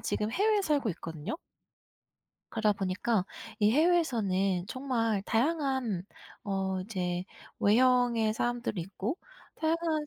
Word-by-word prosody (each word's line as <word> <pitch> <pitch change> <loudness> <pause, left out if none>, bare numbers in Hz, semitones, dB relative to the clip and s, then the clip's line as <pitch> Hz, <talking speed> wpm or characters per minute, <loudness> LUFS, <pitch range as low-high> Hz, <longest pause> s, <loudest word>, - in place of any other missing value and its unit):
지금 210 +1 -1
해외에 410 - +2
살고 290 -8 +1
있거든요. 165 - -5 1.1
그러다 215 -1 +2
보니까 195 +2 0 0.3
이 210 0 +4
해외에서는 225 - +2
정말 230 -5 -1
다양한 260 - 0 0.4
어 190 -1 -1
이제 180 -3 -2 0.3
외형의 235 -1 +4
사람들이 240 -5 -1
있고 195 - -4 0.4
다양한 320 -1 0
225 Hz, 255 characters per minute, -30 LUFS, 195-275 Hz, 1.1 s, 이